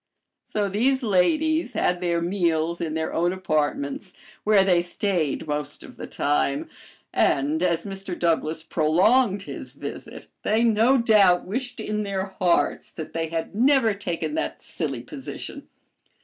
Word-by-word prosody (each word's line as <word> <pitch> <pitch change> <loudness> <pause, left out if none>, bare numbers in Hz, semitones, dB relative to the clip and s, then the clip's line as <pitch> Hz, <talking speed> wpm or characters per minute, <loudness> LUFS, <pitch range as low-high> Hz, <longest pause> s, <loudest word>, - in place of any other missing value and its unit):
So 205 -1 -1
these 255 +7 +1
ladies 280 - +2
had 180 -4 0
their 170 -1 0
meals 170 -2 0
in 160 -2 -2
their 160 0 -2
own 175 +2 +1
apartments, 155 0 -2 0.3
where 210 -2 +5
they 180 -3 +3
stayed 175 -4 -1
most 145 -1 -4
of - - -12
the - - -7
time, 145 -1 0 0.5
and, 145 +4 +2
as 175 -1 +1
Mr. 195 -2 -5
Douglass 160 -1 0
prolonged 190 +7 +2
his - - -8
visit, - - -8 0.2
they 220 +2 +2
no 230 +3 +4
doubt 210 -7 +4
wished 245 +5 -4
in 210 0 -2
their 195 -2 -2 0.2
hearts 175 -2 +2
that 160 - -8
they 165 0 -1
had 165 +2 -4
never 245 0 +4
taken 170 -6 -3
that 75 - -2
silly - - -4
position. - - -8
180 Hz, 145 wpm, -24 LUFS, 160-215 Hz, 0.5 s, where